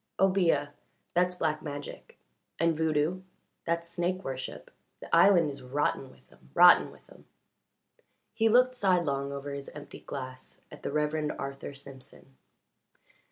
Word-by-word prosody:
"Obeah 180 -7 +3 0.4
that's 180 +1 +2
black 155 -3 -1
magic; 145 -1 -8 0.4
and 165 0 +2
voodoo 160 +3 0 0.4
that's 170 0 -1
snake 175 +2 -2
worship. 130 -1 -6 0.3
The - - -1
island 170 -7 +5
is 140 -1 -9
rotten 135 +1 -1
with - - -22
'em 65 - -22
rotten - - +7
with - - -19
'em." - - -17 1.1
He 225 0 +2
looked 250 +2 +4
sidelong 170 - +1
over 140 0 -5
his 140 0 -6
empty 145 -1 -10
glass 130 -2 -8
at - - -12
the - - -4
Reverend 150 0 -1
Arthur 140 0 -6
Simpson. 135 -1 -12
150 Hz, 135 wpm, -29 LUFS, 140-175 Hz, 1.1 s, rotten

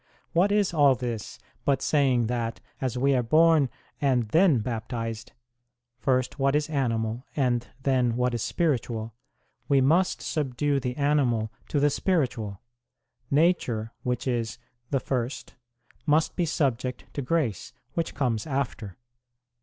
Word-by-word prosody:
What 185 +4 +3
is 205 -3 +2
all 145 -4 +5
this 120 -4 -5 0.3
but 140 -2 +2
saying, 135 -6 +2
that 115 -1 -2 0.2
as 130 -1 -1
we 135 +2 +3
are 125 - +3
born 155 +2 +4 0.3
and 130 -5 +2
then 165 - +5
baptized, 115 0 -4 0.7
first 130 +1 0
what 135 +1 +2
is 150 +1 0
animal 115 -4 -1
and 125 -4 +1 0.2
then 125 -4 +2
what 125 0 +1
is 120 - -2
spiritual, 120 - -1 0.5
we 140 -1 +4
must 165 +8 +3
subdue 145 -1 0
the 125 -1 -3
animal 130 -7 +1 0.2
to 145 - 0
the 145 +1 +3
spiritual; 125 - -1 0.7
nature, 140 -8 +1
which 125 0 -2
is 120 -2 -1 0.3
the 135 - +1
first, 125 0 -3 0.5
must 155 +2 +3
be 175 -2 0
subject 130 -5 -1
to 145 - -3
grace, 125 - -1 0.2
which 165 -1 -2
comes 120 -4 -1
after. 125 - -3
130 Hz, 135 wpm, -27 LUFS, 115-145 Hz, 0.7 s, all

